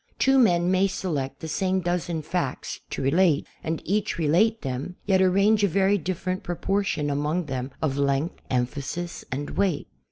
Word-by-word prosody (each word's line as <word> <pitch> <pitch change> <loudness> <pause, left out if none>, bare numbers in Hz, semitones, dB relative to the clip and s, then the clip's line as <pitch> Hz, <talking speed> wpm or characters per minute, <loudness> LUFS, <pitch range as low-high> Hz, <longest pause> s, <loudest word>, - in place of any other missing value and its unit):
Two 270 0 +4
men 175 -6 +4
may 190 +1 +4
select 140 -8 -3
the 160 - -5
same 190 +4 0
dozen 175 -2 -2
facts 145 -5 -3
to - - -3
relate 160 +2 +3 0.2
and 160 0 -3
each 205 +1 0
relate 180 +9 +2
them, 135 +6 -4
yet 190 -2 +3
arrange 200 +3 +4
a - - +5
verv 195 0 +2
different 185 0 -2
proportion 175 -3 -1
among 150 +5 0
them 130 -2 -3
of 140 -2 0
length, 140 +3 0
emphasis 140 +7 -2
and 145 +3 -3
weight. 185 -7 0
175 Hz, 160 wpm, -25 LUFS, 145-190 Hz, 0.2 s, a